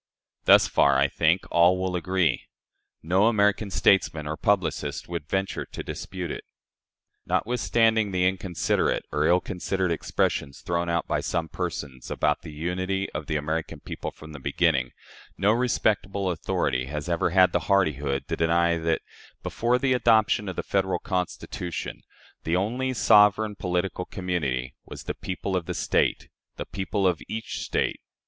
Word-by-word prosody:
Thus - - +7
far, - - +4
I - - +4
think, 85 +4 +2
all 85 +2 +5
will 95 -1 -1
agree. 90 -2 0 0.6
No 95 +6 +3
American 105 -1 +2
statesman 90 -5 +2
or 75 +1 -3
publicist 80 -7 -1
would 85 -3 -5
venture 95 +2 -1
to - - -8
dispute 90 -4 -5
it. - - -6 0.8
Notwithstanding 110 -1 +2
the 90 -1 +2
inconsiderate 95 -2 0
or 75 +1 +1
ill 90 +1 +5
considered 90 0 -2
expressions 70 -3 -1
thrown 85 0 -1
out 85 -1 0
by - - 0
some 80 -1 -2
persons 65 -3 -5
about 75 -1 0
the 80 - -9
unity 95 +5 -2
of - - -5
the 80 - -1
American 80 +2 -2
people - - -6
from 80 0 -13
the 75 - -9
beginning, 70 -2 +1 0.5
no 100 +2 +3
respectable 105 -5 +1
authority 65 -6 -1
has 75 +3 -5
ever 85 0 +1
had 90 +1 +5
the - - +1
hardihood 75 -8 +1
to - - -1
deny 85 +1 +2
that, 80 0 0 0.4
before 120 +2 +1
the 130 0 +1
adoption 110 -4 +3
of 95 - -5
the - - -3
Federal 95 -2 0
Constitution, 90 -2 -4 0.4
the 80 - 0
only 120 +8 0
sovereign 105 -1 +5
political 90 0 -2
community 70 -10 -2
was - - -10
the - - -3
people 95 +1 -4
of 90 -3 -2
the - - -3
State - - +1 0.3
the - - -4
people 100 +1 -2
of 90 -3 +2
each 110 0 -5
State. - - -1
90 Hz, 155 wpm, -26 LUFS, 80-100 Hz, 0.8 s, Thus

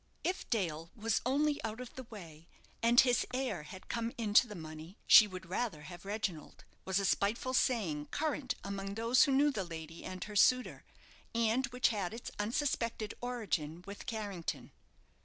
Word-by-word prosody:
"If 370 - -2
Dale 165 -7 -1
was 225 -1 0
only 290 +2 +1
out 220 +1 -4
of 250 -1 -8
the 260 - -8
way, 170 -8 -11 0.3
and 235 +1 +6
his 245 -2 +5
heir 260 -10 -1
had 185 +5 -11
come 230 0 -2
into 220 +1 +4
the 210 - -8
money, 160 +2 -9
she 215 - +9
would 185 -1 -8
rather 185 -3 -2
have 175 +3 -10
Reginald," 195 -7 -4 0.2
was 190 0 +1
a 200 - +1
spiteful 225 +7 +1
saying 185 - +1
current 295 -3 -1
among 195 0 -4
those 230 +3 +4
who 280 - 0
knew 285 +2 +4
the 205 -8 -2
lady 165 -1 -8
and 185 0 -5
her 210 - -8
suitor, 255 +5 +3 0.5
and 230 +3 +2
which 250 +1 +2
had 205 -2 -2
its 235 - -7
unsuspected 230 -1 -1
origin 180 -10 -2
with 200 +4 -9
Carrington. 205 -7 -4
215 Hz, 170 wpm, -33 LUFS, 180-245 Hz, 0.5 s, she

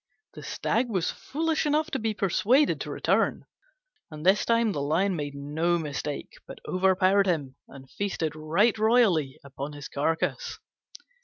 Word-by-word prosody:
The - - -10
Stag 240 +1 -1
was 185 -5 0
foolish 315 +1 -2
enough 305 +2 +1
to 270 - -1
be 220 -1 -2
persuaded 230 +9 +2
to - - -5
return, - - 0 0.6
and 155 0 -9
this 190 +2 +4
time 230 -1 +2
the 145 - -3
Lion 175 +7 +1
made 145 -3 -4
no 155 +5 0
mistake, 150 -2 -5
but - - -9
overpowered 190 +1 +3
him, 145 -7 -1
and 135 -1 -13
feasted 165 -2 -3
right 165 +9 +2
royally 215 - +3
upon 140 +1 -7
his 145 -1 -8
carcase. 165 - -2
180 Hz, 150 wpm, -27 LUFS, 150-220 Hz, 0.6 s, this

